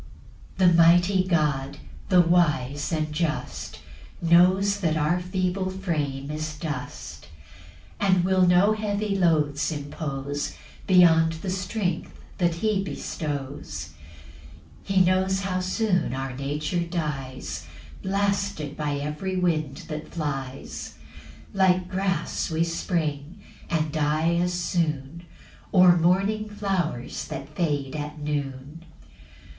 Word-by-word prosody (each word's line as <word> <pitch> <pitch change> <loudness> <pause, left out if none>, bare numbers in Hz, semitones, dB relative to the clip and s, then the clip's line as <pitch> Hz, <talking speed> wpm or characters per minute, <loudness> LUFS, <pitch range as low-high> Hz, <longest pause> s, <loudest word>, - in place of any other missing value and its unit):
PAUSE. - - -4
7 - - +4
The 170 - +6
mighty 175 +3 +5
God, 150 -5 0 0.3
the 180 -2 +7
wise, 155 -5 +1
and 155 -2 -1
just, 155 -1 -3 0.4
Knows 185 +4 +4
that 160 -4 +1
our 155 +4 +2
frame 180 -6 -2
is 155 0 -4
feeble 155 0 -4
dust; 150 - -7 0.7
And 185 -3 +3
will 185 -1 +4
no 180 +4 +5
heavy 210 -1 -1
loads 150 -5 +2
impose 145 -1 -4 0.3
Beyond 165 -3 +6
the 170 +4 -4
strength 185 -2 -3 0.2
that 175 -2 +2
he 200 +2 0
bestows. 140 - -5 1.0
8 - - -4
He 190 - +6
knows 190 +1 +2
how 185 -2 -1
soon 185 - 0
our 135 -1 -4
nature 150 +5 -2
dies, 150 -7 -4 0.3
Blasted 195 -6 -1
by 150 -2 -2
every 150 +7 -3
wind 155 -6 0
that 155 0 -6
flies; 135 -4 -5 0.6
Like 185 -2 +3
grass 190 0 -1
we 160 0 +1
spring, 165 -1 -2 0.3
and 155 -2 0
die 155 +2 +1
as 180 +1 +1
soon, 165 -2 -2 0.5
Or 180 -2 +7
morning 195 +5 +2
flowers 195 -11 -2
that 140 +2 -7
fade 145 -5 -1
at 150 0 -5
noon. 145 +1 -4
165 Hz, 115 wpm, -25 LUFS, 150-185 Hz, 1.0 s, the